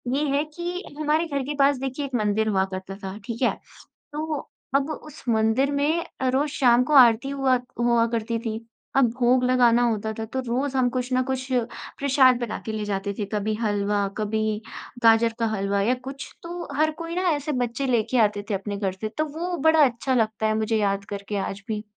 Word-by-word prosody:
ये 290 - +1
है 290 - +2
कि 350 +1 -4 0.2
हमारे 310 +2 +1
घर 280 -4 -2
के 290 +3 -4
पास 275 0 +4
देखिए 270 +2 -3
एक 270 -2 -5
मंदिर 215 -1 +1
हुआ 190 -2 +2
करता 190 +1 -6
था। 190 +1 -5
ठीक 230 +2 -5
है? 250 - +2 0.6
तो 305 -1 -4 0.3
अब 275 +2 +2
उस 305 0 -8
मंदिर 225 +5 +2
में 305 +4 +1 0.2
अ, 260 - +1
रोज़ 275 +4 +1
शाम 250 -3 +4
को 300 - 0
आरती 245 +1 +6
हुआ 270 -2 +2 0.2
हुआ 235 -1 +3
करती 230 0 -1
थी। 225 -1 -4 0.4
अब 275 - +6
भोग 250 +1 +3
लगाना 245 -1 +4
होता 220 -1 -2
था 225 - -2
तो 260 +4 -3
रोज़ 265 +3 -1
हम 255 -1 +3
कुछ 250 +1 -2
न 255 0 +3
कुछ 260 0 -2 0.5
प्रसाद 265 -3 +4
बनाके 225 -1 -4
ले 215 -1 -3
जाते 200 0 -2
थे। 210 - -1
कभी 210 +1 0
हलवा, 205 -1 +1
कभी 215 0 -1 0.4
गाजर 230 0 +5
का 230 - +1
हलवा 200 0 0
या 245 +5 +2
कुछ, 270 +1 -8
तो 345 0 -6
हर 310 +1 +3
कोई 335 0 -5
ना 365 - 0
ऐसे 295 -1 -1
बच्चे 250 +1 -1
लेके 240 0 +1
आते 205 -1 -1
थे - - +1
अपने 200 +1 -3
घर 195 -2 -1
से। 215 - -2
तो 310 - +2
वो 350 +1 -2
बड़ा 320 -2 +6
अच्छा 255 +1 0
लगता 220 -2 +1
है 215 - +1
मुझे 220 +1 0
याद 200 -2 0
करके 200 +1 -5
आज 200 +1 -7
भी। 215 -1 -3
240 Hz, 205 wpm, -24 LUFS, 215-275 Hz, 0.6 s, आरती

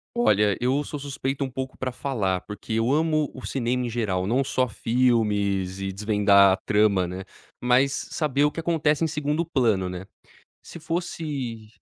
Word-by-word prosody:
Olha, 105 - +3
eu 130 +4 +1
sou 150 0 -6
suspeito 135 0 -3
um 130 - -4
pouco 130 +1 -5
pra 130 -1 -3
falar, 105 -9 -1
porque 105 +1 -7
eu 115 +3 +1
amo 155 0 +1
o 130 - -9
cinema 125 -1 -1
em 120 - -3
geral, 100 -6 -1
não 125 +7 +1
só 130 -1 0
filmes 105 -6 +1
e 95 0 -3
desvendar 100 -1 +4
a - - 0
trama, 105 -4 +2
né, 90 +2 -6 0.4
mas 125 +3 +3 0.2
saber 145 -3 0
o 150 - +3
que - - -6
acontece 160 -2 +1
em - - +3
segundo 150 +1 -1
plano, 115 - +1
né. 90 +1 -6 0.6
Se 170 - -10
fosse 150 -9 -4
125 Hz, 175 wpm, -25 LUFS, 105-145 Hz, 0.6 s, desvendar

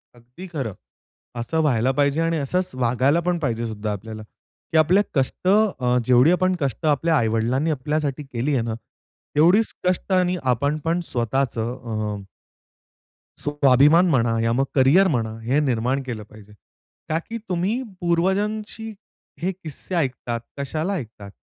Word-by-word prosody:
अगदी 125 +10 -12
खरं. 130 -10 -3 0.7
असं 140 +8 -1
व्हायला 130 -4 +2
पाहिजे 140 +3 +1
आणि 165 0 +1
असच 180 +6 -1
वागायला 130 +5 +2
पण 175 0 0
पाहिजे 120 -6 -1
सुद्धा 110 -1 -4
आपल्याला, 110 +2 -6 0.5
की 160 - +2
आपल्या 175 +6 +4
कष्ट, 135 +6 -1
अ, 185 -12 +3
जेवढी 125 +6 +5
आपण 185 +1 +2
कष्ट 140 +2 -2
आपल्या 155 +2 +2
आई-वडिलांनी 115 +6 +1
आपल्यासाठी 150 0 -2
केली 135 +2 -2
आहे 125 - +2
ना, 115 -1 -3 0.6
तेवढीच 180 +9 +4
कष्ट 185 +1 -1
आणि 180 -1 +2
आपण 135 +4 +1
पण 170 +2 +1
स्वतःच 125 +1 -1
अ 115 +2 -1 1.7
स्वाभिमान 145 +4 +4
म्हणा 115 -6 +2
या 115 0 +1
मग 135 +3 +2
करियर 145 +9 +5
म्हणा 115 -8 -1
हे 125 +6 +1
निर्माण 130 -1 0
केलं 115 -5 -6
पाहिजे 105 -1 -15 0.6
का 160 - +1
की 230 - -3
तुम्ही 185 +8 0 0.2
पूर्वजांशी 210 +6 -1 0.5
हे 185 +3 0
किस्से 180 0 -6
ऐकतात. 130 -6 -1 0.2
कशाला 155 +7 -2
ऐकतात 110 - -8
140 Hz, 145 wpm, -23 LUFS, 120-170 Hz, 1.7 s, जेवढी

